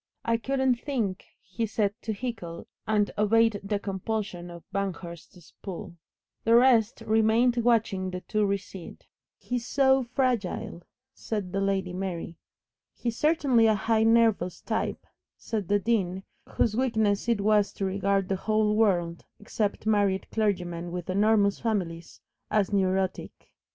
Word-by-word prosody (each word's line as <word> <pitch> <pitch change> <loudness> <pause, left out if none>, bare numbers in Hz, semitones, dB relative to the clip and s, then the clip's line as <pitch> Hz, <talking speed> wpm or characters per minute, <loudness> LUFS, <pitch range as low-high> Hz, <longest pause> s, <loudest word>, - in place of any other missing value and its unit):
"I 230 0 +2
couldn't 265 0 +1
think 230 -10 -2
" - - -54
he 225 +6 -3
said 205 -1 0
to 220 - -3
Hickle, 200 -7 -5 0.2
and 210 -1 +2
obeyed 220 0 +3
the 205 +1 -1
compulsion 195 -2 -4
of 170 -1 -10
Banghurst's 180 -3 -6
pull. 190 -1 -7 0.5
The 230 +1 +4
rest 235 -3 +4
remained 225 +3 +3
watching 225 -5 +1
the 180 0 -5
two 215 +2 -1
recede. 195 -2 -4 0.3
"He 250 - -3
is 240 0 -6
so 270 -1 +4
fragile," 240 -8 -2 0.3
said 205 -5 -4
the 195 - 0
Lady 190 -2 -1
Mary. 175 -3 -5 0.6
"He's 235 -2 -3
certainly 280 -7 +3
a 220 - +4
highly 220 +2 +1
nervous 225 -6 +3
type," - - -3 0.3
said 210 -5 -4
the 205 - +3
Dean, 195 -4 -1 0.3
whose 215 -2 0
weakness 220 -4 +1
it 230 -3 +2
was 210 0 +3
to 195 - -3
regard 195 0 0
the 195 - -1
whole 215 +1 +1
world, 175 -6 +1
except 210 0 -2
married 205 -3 +2
clergymen 175 -5 -1
with 180 +1 -4
enormous 205 0 +3
families, 180 -7 -3 0.3
as 210 -1 +1
"neurotic." 190 -1 -1
205 Hz, 140 wpm, -27 LUFS, 190-225 Hz, 0.6 s, The